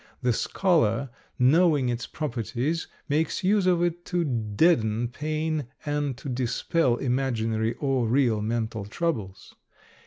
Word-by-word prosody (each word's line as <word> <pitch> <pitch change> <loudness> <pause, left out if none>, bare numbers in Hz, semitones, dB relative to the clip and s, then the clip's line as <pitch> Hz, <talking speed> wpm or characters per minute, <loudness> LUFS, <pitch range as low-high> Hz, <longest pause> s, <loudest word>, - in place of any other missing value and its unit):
The 125 -1 +3
scholar 135 - +1 0.3
knowing 145 +1 +4
its 120 -1 -2
properties 140 +3 -2 0.2
makes 155 +4 0
use 195 0 +3
of 175 -1 +3
it 175 0 -1
to 175 -1 0
deaden 115 -1 +1
pain 155 +1 -2 0.2
and 145 -3 -1
to 135 - -9
dispel 125 +2 +1
imaginary 115 -3 -1
or 135 -4 0
real 120 -3 +2
mental 110 -1 -2
troubles. 110 - -3
130 Hz, 120 wpm, -26 LUFS, 115-155 Hz, 0.3 s, knowing